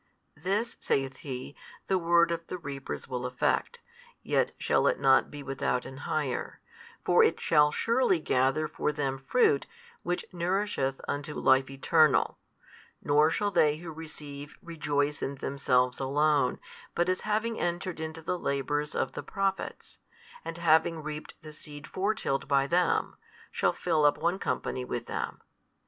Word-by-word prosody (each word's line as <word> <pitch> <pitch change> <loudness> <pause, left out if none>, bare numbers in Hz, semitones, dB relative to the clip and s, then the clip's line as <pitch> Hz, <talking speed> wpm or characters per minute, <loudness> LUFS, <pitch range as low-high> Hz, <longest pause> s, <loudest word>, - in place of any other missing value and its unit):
This 195 +9 -1
(saith 135 -1 0
He) 130 0 -7 0.3
the 190 -1 +1
word 170 0 +4
of 170 0 -3
the 180 - -4
reapers 140 -5 -6
will 125 -2 -3
effect, 125 0 -1 0.4
yet - - +1
shall - - +2
it - - +2
not 135 -1 +4
be 145 -1 -8
without 130 -2 -1
an 130 - -8
hire: 145 -5 -2 0.5
for - - +6
it - - +2
shall 150 -1 +4
surely 230 -4 +2
gather 135 +2 +1
for 150 - -1
them 135 -3 -2
fruit 430 - +2 0.3
which 175 - -2
nourisheth 175 -6 -1
unto 145 +1 -3
life 130 0 +3
eternal: 150 +2 +3 0.6
nor 150 +2 +4
shall 205 +5 0
they 155 -5 +3
who 165 0 -8
receive 150 -2 -8
rejoice 145 -3 -1
in 140 - -2
themselves 125 -2 +1
alone 140 0 +2 0.4
but 175 - +2
as 185 0 0
having 220 +2 -1
entered 175 0 -2
into 160 0 -5
the 180 +2 -2
labours 145 +1 -1
of - - 0
the - - -5
Prophets, 195 -1 -3 0.4
and 165 - -6
having 160 -1 +3
reaped 150 0 -6
the 155 -1 -9
seed 145 -1 -10
fore 200 +3 -1
tilled 135 -9 -2
by 140 -1 +3
them, 175 +5 +1 0.3
shall - - +2
fill 160 -4 +1
up 145 - +4
one 170 +4 0
company 130 - -2
with 120 -1 -4
them. - - -4
150 Hz, 155 wpm, -29 LUFS, 135-175 Hz, 0.6 s, for